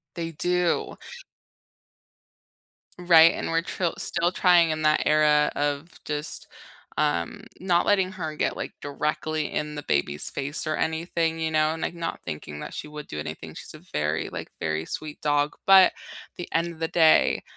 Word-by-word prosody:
They 165 -1 -3
do. 180 +2 0 2.0
Right? 165 -2 +7
And - - -3
we're 165 0 +1
tril 175 -1 -2
still 170 +1 +1
trying 175 -2 +4
in 155 0 -2
that 155 0 +3
era 150 -1 +4
of 145 +3 -1
just, 150 +1 -4 0.5
um, 85 -1 -1 0.2
not 175 -2 +1
letting 190 -2 +2
her 160 -5 -5
get, - - -1
like, - - -5
directly 150 +1 -2
in 150 0 -3
the 145 - -5
baby's 70 - -1
face 140 +2 -2
or 155 -1 -1
anything, 165 0 -1
you 160 - -1
know, 155 0 +2
and, 160 - -6
like, - - -2
not 170 -1 -4
thinking 75 -1 -6
that - - -7
she - - -6
would 150 -1 -9
do 75 - -6
anything, 75 +1 -6
she's - - -9
a - - -11
very, 75 +2 -1
like, - - -7
very 80 0 -1
sweet 150 - -6
dog, 145 0 +1
but, 190 -1 +9
at - - -1 0.4
the 175 - -6
end 170 +1 0
of 165 - -15
the 165 - 0
day, 160 -1 +4
155 Hz, 175 wpm, -25 LUFS, 145-170 Hz, 2.0 s, but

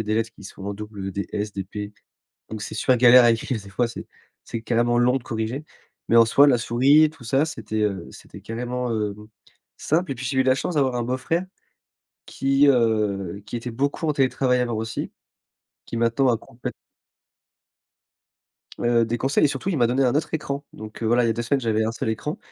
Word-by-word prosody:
a - - 0
des 110 +1 -1
lettres 115 0 0
qui - - -15
sont 95 0 -10
en 100 0 -3
double, 105 -2 -7
heu, - - -3
des 100 +1 -3
«S» 105 0 -3
des 95 -1 -4
«P» 105 +1 -7 0.6
donc 110 - -6
c'est - - -6
super 130 - +2
galère 125 +1 +8
à 120 - +6
écrire 115 +1 -1
des 100 - -12
fois, 120 +5 0
c'est 115 - -8 0.4
c'est 115 - -5
carrément 120 +1 +1
long 125 +2 +3
de 135 - -4
corriger, 115 +5 -4 0.4
mais 115 - +4
en 115 - +8
soi, 140 +5 +5
la 125 -4 +4
souris 135 +7 +4
tout 155 -4 -17
ça, 135 +5 +2
c'était, 110 -9 -4
heu, 100 -4 -2
c'était - - -13
carrément, 125 +2 -4
hem, 105 -1 -3 0.5
simple. 160 +1 0
Et - - -5
puis 135 - -7
j'ai 130 +2 -1
eu 130 - +5
la 130 0 +3
chance 170 - -3
d'avoir 130 -4 +1
un 120 - -1
beau 125 +2 -1
frère, 165 +7 -1 0.8
qui, 135 +1 +2
heu, 105 -6 +1
qui - - -5
était 120 +1 -5
beaucoup 140 +6 -1
en - - +3
télétravail, 130 -2 +2
alors 120 -2 -1
aussi, 110 0 -4 0.7
qui 115 - -6
maintenant 115 +3 +2
a 120 - +3
complèt 120 +2 -8 2.1
Heu, 120 -1 +2
des 115 +1 -2
conseils 135 +3 +2
et - - +5
surtout 140 +7 -4
il 180 - 0
m'a 120 - +4
donné 130 +3 +1
un 125 +1 +2
autre 150 - -1
écran, 140 -2 -3
donc, 110 +1 -10
heu, - - 0
voilà, 120 +1 +3
il - - +3
y 115 - +2
a - - +3
2 120 +1 -3
semaines 135 +3 0
j'avais 110 -2 0
un 115 - -1
seul 115 - -3
écran. 150 +8 -3
120 Hz, 225 wpm, -23 LUFS, 110-135 Hz, 2.1 s, galère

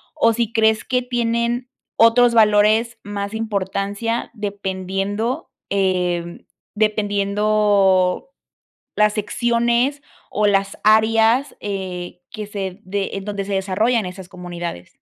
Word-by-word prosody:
o 230 - +4
si 230 -1 -1
crees 220 -1 +3
que 250 -1 +1
tienen 240 0 -1 0.3
otros 235 +1 +5
valores 220 +2 +4
más 200 0 -5
importancia 205 +1 -2
dependiendo, 205 - -3 0.2
eh, 180 -3 -1 0.3
dependiendo 205 - +2 0.7
las 210 0 +4
secciones 235 +5 0 0.3
o 210 0 +1
las 195 -1 +1
áreas, 225 +4 +4
eh, 180 -3 -5
que 210 -2 -6
se 195 -2 -5
de 195 +1 -3
en 195 -1 -5
donde 200 -1 -3
se 200 - -4
desarrollan 200 +4 +1
esas 180 0 -8
comunidades. 175 - -7
210 Hz, 105 wpm, -20 LUFS, 195-230 Hz, 0.7 s, otros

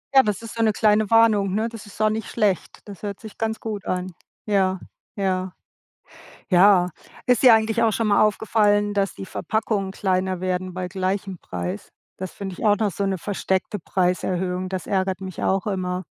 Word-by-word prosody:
Ja, 265 - +10
das 210 -2 -2
ist 225 - -7
so 230 - -2
'ne 215 -2 +3
kleine 215 -1 +3
Warnung, 215 -4 +4
ne? 220 +2 0
Das 225 -2 -10
ist 205 - -14
auch 215 0 +3
nicht 220 0 -4
schlecht. 205 -6 -1
Das 200 -3 -10
hört 200 -2 -5
sich 220 -2 -11
ganz 220 -1 -1
gut 215 -3 -5
an. 185 0 -2 0.3
Ja, 190 -3 +1 0.4
ja. 185 -2 -1 1.0
Ja, 180 -1 +5 0.3
ist 250 -1 +3
dir 250 -3 +9
eigentlich 225 +1 +2
auch 225 - +4
schon 220 +1 0
mal 205 - +4
aufgefallen, 210 -1 +2
dass 200 -1 0
die - - -8
Verpackungen 205 -1 -2
kleiner 185 -2 -1
werden 185 0 -2
bei 185 -1 -3
gleichem 190 0 -3
Preis? 90 +2 -5 0.3
Das 185 -1 -6
finde 195 -2 -6
ich - - -8
auch 205 -1 +5
noch 210 -1 0
so 200 - -3
'ne 195 -1 0
versteckte 190 +2 -2
Preiserhöhung, 180 +1 -1
das 185 -3 -4
ärgert 190 -1 0
mich 190 -2 -6
auch 195 +1 +1
immer. 185 -2 -2
195 Hz, 190 wpm, -23 LUFS, 185-215 Hz, 1.0 s, Ja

